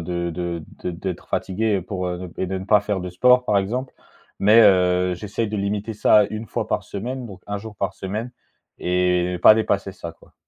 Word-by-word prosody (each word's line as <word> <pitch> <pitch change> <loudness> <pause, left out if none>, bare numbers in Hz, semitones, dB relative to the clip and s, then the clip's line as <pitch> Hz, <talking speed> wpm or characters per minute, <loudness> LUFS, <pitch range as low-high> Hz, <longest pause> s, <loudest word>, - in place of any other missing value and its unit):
de 85 0 -3
de 85 -1 -4 0.2
de 90 - -1
d'être 90 +1 -6
fatigué 100 +1 0
pour, 90 0 -4
heu, 90 0 -5
et 95 - -1
de 95 +1 -3
ne 95 - -7
pas 105 0 +4
faire 100 -2 -2
de 90 0 -5
sport 125 +7 +4
par 105 -3 +2
exemple, 125 +7 -3 0.5
mais 105 +3 +6
heu, 90 -2 +4
j'essaye 105 +4 -3
de 105 - -3
limiter 100 +2 -2
ça 105 0 +4
à - - +4
1 110 +1 -6
fois - - -3
par - - -1
semaine, 125 +5 -5
donc 100 -3 -11
1 100 0 -2
jour 110 0 -9
par 100 +1 -2
semaine 105 +6 -5 0.5
et 90 0 +1
pas 110 - +9
dépasser 100 -3 0
ça 85 -3 -8
quoi. - - -23
100 Hz, 210 wpm, -22 LUFS, 90-105 Hz, 0.5 s, pas